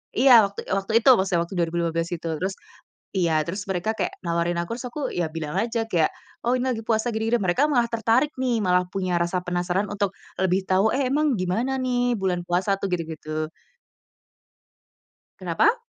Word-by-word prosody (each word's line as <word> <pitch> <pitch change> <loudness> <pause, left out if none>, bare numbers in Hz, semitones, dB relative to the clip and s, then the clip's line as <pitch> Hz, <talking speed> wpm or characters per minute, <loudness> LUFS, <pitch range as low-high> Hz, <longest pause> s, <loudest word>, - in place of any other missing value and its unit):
iya 245 -2 +8
waktu 200 0 -7
waktu 195 +2 -1
itu, - - +8
maksudnya 185 -3 +1
waktu 190 - -11
2015 165 0 0
itu 175 - -1 0.2
terus 190 +1 -2 0.6
iya, 165 -4 +2
terus 195 +4 -4
mereka 185 +3 -1
kayak 185 - -1
nawarin 170 +1 0
aku, 175 +7 -4
terus 250 - -6
aku 300 - -5
ya 175 -2 -1
bilang 160 +1 -4
aja 230 +2 0
kayak, 165 -3 +2 0.4
"oh 245 - +3
ini 245 - -2
lagi 225 - -5
puasa 225 +1 +1
gini 220 0 -2
gini" 240 - +4
mereka 185 +11 +2
malah 240 -4 +2
tertarik 230 +5 +2
nih, 250 -3 +1
malah 180 -1 +2
punya 185 -3 0
rasa 175 +1 -1
penasaran 180 +2 -1
untuk 200 -1 -1 0.2
lebih 190 0 +2
tahu, 195 +4 +3
"eh 265 -2 0
emang 295 -1 +2
gimana 225 +9 0
nih 245 -1 +1
bulan 180 -2 0
puasa 190 +3 +1
tuh?" - - -1
gitu 175 - 0 0.2
gitu. 155 0 -4 1.9
Kenapa? 440 - +2
190 Hz, 180 wpm, -24 LUFS, 175-235 Hz, 1.9 s, iya